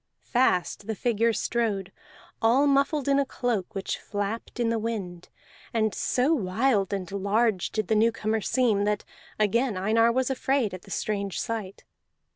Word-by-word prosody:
Fast 205 -5 +1
the 220 - -2
figure 230 0 +1
strode, 210 -4 -1 0.5
all 245 +6 +4
muffled 280 0 +2
in 280 0 +4
a - - +3
cloak 245 -7 -2
which 195 - -3
flapped 205 +4 -4
in 235 -1 +2
the 230 -1 0
wind; 195 -6 -5 0.5
and 220 -2 +2
so 260 +6 +1
wild 210 - +1
and 195 -3 -3
large 200 0 +1
did 215 -3 -2
the - - +2
newcomer 220 0 +1
seem 225 -4 +2
that 210 0 0 0.3
again 215 +1 +1
Einar 225 +4 +3
was 260 +2 0
afraid 265 -5 0
at 185 - -7
the - - -16
strange 200 -2 -2
sight. 215 -4 -4
220 Hz, 155 wpm, -26 LUFS, 200-245 Hz, 0.5 s, all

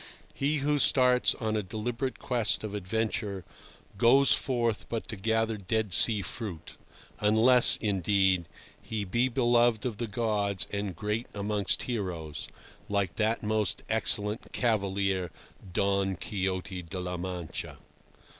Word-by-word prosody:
He 145 +3 0
who 150 0 +2
starts 125 -2 +4
on 110 -2 -2
a 105 - +1
deliberate 115 +6 -4
quest 120 -6 0
of 105 -2 -5
adventure 105 -1 -2 0.5
goes 135 +4 +6
forth 120 -4 -1
but 115 -1 -4
to 115 - -4
gather 110 +2 0
dead 105 0 -1
sea 105 +3 +6
fruit, 95 -9 -6 0.4
unless, 115 +4 +5
indeed, 95 -3 +1 0.3
he 110 -2 -4
be 120 +7 +1
beloved 120 -2 +2
of 115 -5 -3
the 120 0 -3
gods 105 -5 -1
and 100 -3 -3
great 105 +5 -3
amongst 105 0 0
heroes, 90 - -4 0.4
like 100 -3 -1
that 110 +1 0
most 110 -2 -1
excellent 105 +2 0
cavalier 100 -5 0 0.4
Don 100 +1 +1
Quixote 95 0 -3
de 90 +2 -7
la 90 0 -4
Mancha. 90 -2 -5
105 Hz, 125 wpm, -29 LUFS, 95-115 Hz, 0.5 s, goes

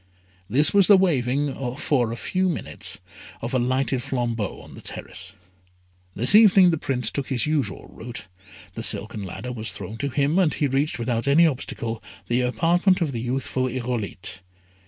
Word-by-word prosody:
This 145 +4 +4
was 200 -2 +6
the 205 - +8
waving, 140 -5 +1 0.2
for 125 -5 0
a - - -3
few 185 +6 0
minutes, 170 - -3 0.4
of 120 - -5
a 130 - +2
lighted 130 +1 0
flambeau 120 -5 -2
on - - -13
the - - -11
terrace. 95 +2 -7 0.8
This 120 - +2
evening 195 -4 +7
the 160 - -1
Prince 125 -6 -1
took 140 -2 -3
his 125 -4 0
usual 140 - -1
route, 120 +1 -8 0.5
the - - -5
silken 110 0 -1
ladder 100 +6 -6
was 110 -4 -3
thrown 100 +2 -7
to 140 +4 -2
him, 145 +6 +1
and 175 -5 +2
he 150 - 0
reached, 140 +3 0
without 120 +1 -2
any 155 +5 +6
obstacle, 115 -6 -2 0.3
the 120 +1 +2
apartment 175 +9 +2
of 165 -5 0
the 115 -3 -4
youthful 130 +1 -1
Irolite. 120 -7 -4
130 Hz, 170 wpm, -24 LUFS, 115-150 Hz, 0.8 s, the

